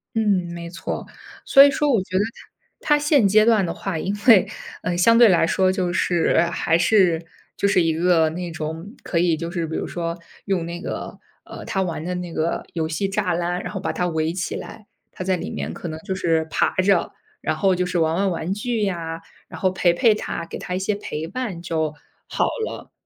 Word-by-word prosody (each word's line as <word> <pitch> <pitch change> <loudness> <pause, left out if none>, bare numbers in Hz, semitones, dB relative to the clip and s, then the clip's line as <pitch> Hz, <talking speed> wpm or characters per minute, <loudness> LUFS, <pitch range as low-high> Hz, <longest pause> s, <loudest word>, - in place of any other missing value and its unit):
嗯， 200 -5 +2
没 170 0 -7
错， 180 +2 -5 0.4
所 275 - +8
以 285 - +7
说 290 +1 +1
我 220 - +3
觉 185 - -3
得 200 - +3 0.6
他 295 - +3
他 - - +3
现 290 -8 +4
阶 215 +2 +5
段 225 -3 +4
的 165 - -3
话， 195 -4 -4
因 195 +5 -2
为， 220 -6 +7 0.3
呃 175 -1 -2
相 230 +6 +5
对 235 -2 +8
来 175 -3 +4
说 185 +2 +2
就 180 -2 -1
是， 170 -1 +2
还 165 -1 +1
是 175 -2 +3 0.3
就 - - +1
是 185 -3 +3
一 165 -1 +1
个 165 -1 +3
那 175 +2 -5
种 160 +6 -6
可 170 - -1
以 170 -2 +2
就 170 +1 -5
是 170 -2 -2
比 160 - -5
如 - - -2
说， 170 -1 -4 0.3
用 185 -4 0
那 170 +1 -6
个， - - -6 0.3
呃 - - -9
他 190 -2 -1
玩 165 -3 -4
的 180 +1 -3
那 175 -2 -5
个 160 +2 -1
游 160 -2 -1
戏 160 +5 -1
栅 195 -3 0
栏， 175 +1 -1
然 - - -6
后 190 - -4
把 195 - -3
他 180 - -1
围 160 -1 -1
起 180 - -3
来， 215 -2 -9 0.2
他 - - -6
在 185 0 +1
里 80 - -5
面 75 +2 -4
可 - - -6
能 160 0 -6
就 190 +3 -4
是 165 -3 +1
爬 - - +1
着， 185 -1 +2 0.3
然 155 - -1
后 190 +3 +2
就 180 0 0
是 180 -1 -1
玩 160 0 +2
玩 195 +1 +1
玩 170 +1 -3
具 225 +2 -2
呀， 165 -4 -3 0.3
然 - - -10
后 185 - +3
陪 180 -1 +2
陪 215 +4 +4
他， - - -4
给 - - -6
他 180 - -6
一 185 - -1
些 200 +2 -1
陪 160 -5 -5
伴， 200 -4 -4
就 160 -3 -2 0.3
好 - - 0 0.2
了。 - - -8
180 Hz, 240 characters per minute, -22 LUFS, 165-195 Hz, 0.6 s, 所